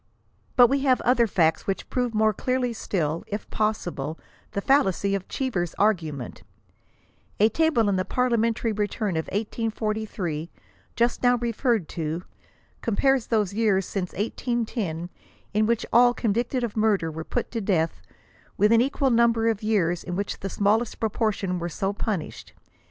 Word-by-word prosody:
But 245 - +8
we 275 +3 +2
have 265 -2 +3
other 240 -1 +3
facts 165 -5 +1
which 195 - -2
prove 245 -3 -1
more 215 0 +3
clearly 255 +2 -1
still, 165 -7 -2
if 205 +1 -5
possi 215 -5 -1
ble, 150 +4 -5 0.4
the 200 - -1
fallacy 200 - +2
of 195 -2 -2
Cheever's 185 -11 -2
argument, 160 - -1 1.0
A 215 +2 +6
table 315 -7 +2
in 200 -2 +2
the 185 - +1
Parliamen 230 0 +1
tary 230 - -1
return 210 -2 -1
of 160 - -1
1843, 215 -6 -3 0.5
just 235 +1 +1
now 245 0 +4
referred 235 - 0
to, 165 +1 -3 0.6
compares 255 +2 +2
those 210 -4 +1
years 205 -4 +2
since 185 -2 -3
1810 210 -6 -2 0.4
in 215 +1 +2
which 235 0 +1
all 245 0 +6
convicted 240 +3 0
of 230 -3 -3
murder 210 -7 +2
were 160 +1 -6
put 245 - -3
to 230 - -2
death, 175 -5 0 0.6
with 210 +2 +4
an 230 0 +6
equal 270 +1 +1
niimber 230 -1 +3
of 215 - -5
years 185 -6 +1
in 180 - -4
which 200 +1 -3
the 195 - -4
smallest 210 +4 +1
proportion 210 -4 -1
were 170 0 -3
so 195 +5 -2
punished. 205 -5 -4
215 Hz, 155 wpm, -25 LUFS, 185-235 Hz, 1.0 s, But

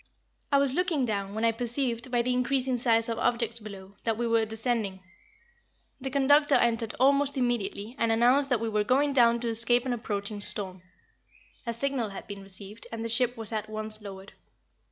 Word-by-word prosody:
I 280 - +5
was 275 -2 +2
looking 335 -5 +1
down, 200 -3 -3
when 220 +1 0
I 230 - +4
perceived, 240 +1 -1
by 240 -1 +1
the 250 +1 0
increasing 255 +1 +1
size 230 -2 +3
of 230 -1 -3
objects 235 -1 0
below, 200 -2 -11
that 225 -2 -1
we 240 - -1
were 230 -1 +2
descending. 220 -3 -2 1.0
The 265 0 -4
conductor 285 +2 +4
entered 230 -2 +1
almost 280 +1 +3
immediately, 235 -2 -2
and 230 -1 +2
announced 250 +5 +3
that 250 -4 +2
we 230 - -1
were 210 -1 0
going 280 +6 +2
down 235 -2 +4
to 240 - -2
escape 235 +2 +4
an 255 - -1
approaching 205 -3 -4
storm. 190 -3 -4 0.9
A - - 0
signal 260 -3 -1
had 195 - -9
been 200 -1 -8
received 195 +3 -8
and 230 0 -5
the - - -3
ship 245 +1 +1
was 225 -1 -5
at 215 -1 -3
once 215 0 -6
lowered. 195 -1 -10
230 Hz, 190 wpm, -28 LUFS, 215-255 Hz, 1.0 s, I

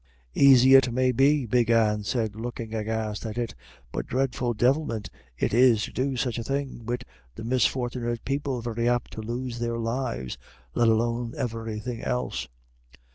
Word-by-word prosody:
"Aisy 135 -1 +7
it 135 -2 +7
may 130 +1 +2
be," 135 +2 +3
Big 120 0 +2
Anne 105 -2 +3
said, 110 0 -1
looking 115 0 -6
aghast 110 -1 -2
at 110 0 -5
it, 120 -1 -2 0.4
"but - - -4
dreadful 125 -2 -1
divilment 120 -2 +1 0.3
it - - 0
is 120 -2 +5
to - - -5
do 135 +1 -1
such 120 -1 -1
a - - -3
thing, 135 -3 -4
wid 120 +1 -2 0.3
the 110 - -7
misfort'nit 120 -1 0
people 135 -2 -2
very 115 0 -1
apt 120 -1 0
to 110 - -6
lose 120 +2 -4
their 115 0 -1
lives, 115 - -3 0.3
let 120 - +3
alone 115 +1 +1
everythin' 115 -2 -4
else." 125 0 -2
120 Hz, 160 wpm, -26 LUFS, 115-130 Hz, 0.4 s, Aisy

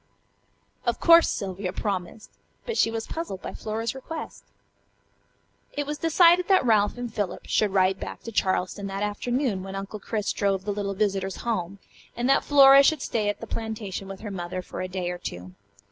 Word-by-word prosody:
Of - - -1
course 335 0 +7
Sylvia 190 -1 -3
promised, 195 0 -4 0.3
but 465 - -3
she 230 - +3
was 225 0 -4
puzzled 320 - -5
by - - -5
Flora's 225 +2 -3
request. 310 +4 -7 1.3
It 290 - -2
was 295 +1 -4
decided 345 +2 +5
that 380 -8 +4
Ralph 215 -1 +3
and 245 -2 -5
Philip 205 -4 -3
should 215 - +2
ride 190 0 +2
back - - -7
to 230 - -6
Charleston 190 -1 0
that 195 +1 -3
afternoon 225 +1 -1
when 195 +1 -7
Uncle 195 +2 -6
Chris 210 +1 -2
drove 195 -2 0
the 205 - -1
little 200 -1 -3
visitors 195 -2 -1
home, 200 -5 -2 0.4
and 240 +1 0
that 275 - +4
Flora 275 -1 +8
should 280 0 +2
stay 215 -3 0
at 205 - -4
the - - -5
plantation 220 -4 -5
with 195 0 -8
her 210 -2 -6
mother 180 0 -5
for - - -7
a 185 - -3
day 185 -1 -3
or 180 - -6
two. 90 - -7
205 Hz, 185 wpm, -26 LUFS, 190-245 Hz, 1.3 s, Flora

